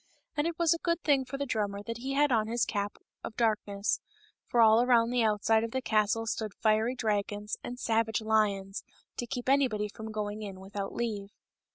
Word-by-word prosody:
And 295 +2 +1
it 335 -1 -3
was 340 -1 +4
a 335 - -4
good 335 0 0
thing 275 -3 +3
for 255 +2 -5
the 280 - -2
drummer 205 -4 -2
that 230 +1 -5
he 265 +3 -3
had 290 0 +3
on 220 -3 +2
his 235 +1 +1
cap 205 -1 -3 0.3
of 220 - -6
darkness, 210 -3 0 0.5
for 240 - 0
all 225 0 +7
around 240 -1 +3
outside 220 -1 +3
of 230 - -2
the 260 - -1
castle 220 0 +1
stood 220 -2 -3
fiery 220 +3 +2
dragons 210 -2 -1
and 245 - -6
savage 225 -1 +1
lions 210 -3 0 0.3
to 240 - -3
keep 245 +1 -4
anybody 250 -7 +2
from 220 +1 -8
going 210 0 -3
in 195 -3 -7
without 195 +1 -5
leave. 210 -4 -2
220 Hz, 195 wpm, -30 LUFS, 210-245 Hz, 0.5 s, all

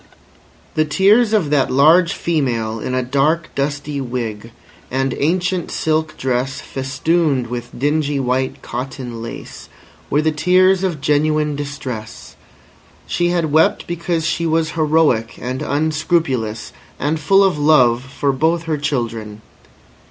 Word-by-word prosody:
The 155 - +2
tears 205 +9 +3
of 190 -10 +1
that 140 -3 +2
large 160 +6 +5
female 120 -9 -1
in 130 +4 -3
a 130 - 0
dark, 150 +6 0
dusty 145 0 -2
wig, 115 -4 -4 0.4
and 135 0 -1
ancient 180 +3 0
silk 155 0 -1
dress 130 +1 -1
festooned 135 +1 0
with 120 0 -6
dingy 145 +1 0
white 130 0 -1
cotton 125 -1 -6
lace, 115 - -9 0.4
were 150 +2 +2
the 160 - +2
tears 185 +4 +3
of 170 -7 -2
genuine 150 +1 +1
distress. 130 -6 -7 0.7
She 175 - 0
had 170 -3 0
wept 155 +2 +3
because 170 -1 -2
she 165 0 0
was 160 0 +1
heroic 155 -8 +1
and 130 +1 -4
unscrupulous 150 -7 -1 0.2
and 155 +2 -1
full 195 +6 +4
of 185 -6 +1
love 125 -5 +4
for 140 +1 -1
both 160 +5 +1
her 160 -3 -2
children. 115 -7 -3
145 Hz, 130 wpm, -18 LUFS, 130-160 Hz, 0.7 s, large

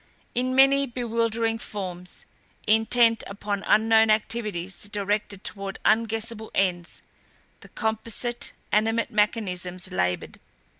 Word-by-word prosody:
In 255 +1 0
many 275 +1 +5
bewildering 230 -2 -1
forms, 180 -5 -6 0.4
intent 225 +1 +4
upon 200 0 -3
unknown 220 0 +5
activities 210 -4 0
directed 205 -1 -2
toward 195 -1 -5
unguessable 225 0 +1
ends, 175 -3 -1 0.6
the - - -15
composite, 230 +2 -2 0.2
animate 225 +2 +1
mechanisms 185 -5 -1
labored. 90 0 -2
220 Hz, 95 wpm, -25 LUFS, 195-230 Hz, 0.6 s, many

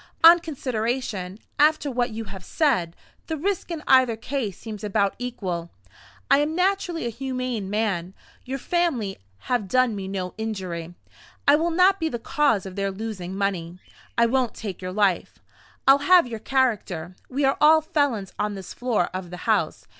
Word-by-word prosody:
On 335 +1 +10
consideration, 240 - -3 0.2
after 300 -1 +3
what 245 0 0
you 225 0 -5
have 195 -3 -9
said, 205 - +1 0.3
the 320 - -2
risk 380 +5 -2
in 325 -3 -5
either 260 -3 +5
case 225 -4 -3
seems 215 -3 -8
about 200 -1 +1
equal. 185 -9 -4 0.6
I 275 - +7
am 300 +2 0
naturally 365 -4 0
a - - 0
humane 255 -4 -3
man; 195 -4 -1 0.3
your 265 +1 -4
family 275 - -1 0.2
have 240 -6 -1
done 255 +1 +2
me 195 -1 -5
no 185 -2 -4
injury; 180 -6 -4 0.5
I 285 - +8
will 330 +3 +1
not 370 +3 +4
be 320 -1 0
the 240 - -3
cause 230 -4 +1
of 190 -1 -8
their 195 -1 -1
losing 190 -2 -5
money; 180 -4 -2 0.4
I 235 - +5
won't 250 0 +1
take 200 -5 -6
your 185 0 -4
life, 195 -2 +1 0.5
I'll 270 +1 +8
have 360 +3 +6
your 230 -3 -6
character. 210 -10 0
We 275 +2 0
are 270 - +2
all 315 +1 +7
felons 285 - 0
on 210 -1 -1
this 190 -2 -8
floor 245 -2 0
of 185 -1 -5
the 180 - -7
house. - - +1
230 Hz, 170 wpm, -24 LUFS, 195-280 Hz, 0.6 s, On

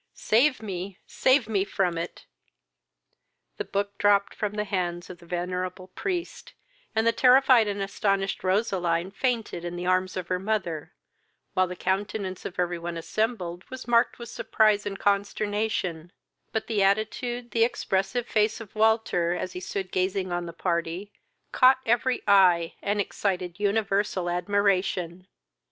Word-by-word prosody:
Save 255 +2 +2
me, 190 -1 -5
save 260 -3 +2
me, 200 -3 +1
from 195 -3 0
it!" 170 +1 -5 1.3
The - - -2
book 200 0 -3
dropped 200 -1 +3
from 210 -1 -3
the 210 0 -1
hands 180 -4 -3
of 175 - -12
the 170 - -16
venerable 180 +1 -3
priest, 355 - -4 0.4
and 220 - +2
the 230 - +5
terrified 250 -1 +5
and 205 0 -2
astonished 195 -1 -1
Roseline 185 -3 0
fainted 230 -6 -2
in 175 0 -4
the 175 0 -4
arms 185 +1 +1
of 180 -2 -4
her 180 -1 0
mother, 190 -6 -2 0.6
while 185 0 +3
the 180 - -6
countenance 190 0 -2
of 180 - -6
every 175 -1 -1
one 170 0 -5
assembled 180 0 -2
was 260 -1 -8
marked 235 0 +3
with 235 -1 -8
surprise 215 -2 +2
and 195 -1 -4
consternation, 200 -4 -1 0.4
but 220 - -2
the 215 -3 0
attitude, 235 +5 0
the 225 - +3
expressive 210 0 0
face 215 0 +1
of 225 -4 -10
Walter, 215 -6 +2
as 185 +1 -4
he - - -5
stood 185 0 -4
gazing 185 0 -1
on 175 0 -2
the - - -5
party, 170 +3 -2 0.4
caught 260 0 +6
every 245 +2 +1
eye, 180 -4 +5
and 205 +1 -1
excited 185 -3 -2
universal 200 -3 0
admiration. 185 -2 0
195 Hz, 150 wpm, -26 LUFS, 180-220 Hz, 1.3 s, caught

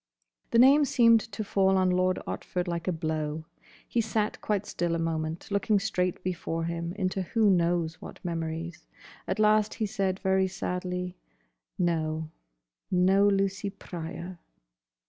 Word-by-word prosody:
The - - +2
name 275 +5 +7
seemed 230 -4 +5
to 215 - -4
fall 195 -1 +2
on 185 -1 +3
Lord 185 0 +2
Otford 180 0 -3
like 170 0 -3
a - - +3
blow. 155 -1 -3 0.4
He 235 - +1
sat 215 -1 -1
quite 210 -1 -1
still 170 -3 -1
a - - 0
moment, 165 +1 -3
looking 200 +1 +2
straight 180 -3 -1
before 165 -2 -2
him 170 +1 -3
into 190 -1 -1
who 210 +3 +2
knows 170 -2 +1
what - - -9
memories. 165 0 -4 0.4
At - - -1
last 215 0 +3
he 220 - -1
said 195 -2 -1
very 190 0 +2
sadly, 180 -1 -4 0.6
"No. 160 -2 -1 0.6
No 190 +2 +4
Lucy 195 0 +1
Pryor." 175 -1 -7
185 Hz, 145 wpm, -28 LUFS, 170-200 Hz, 0.6 s, name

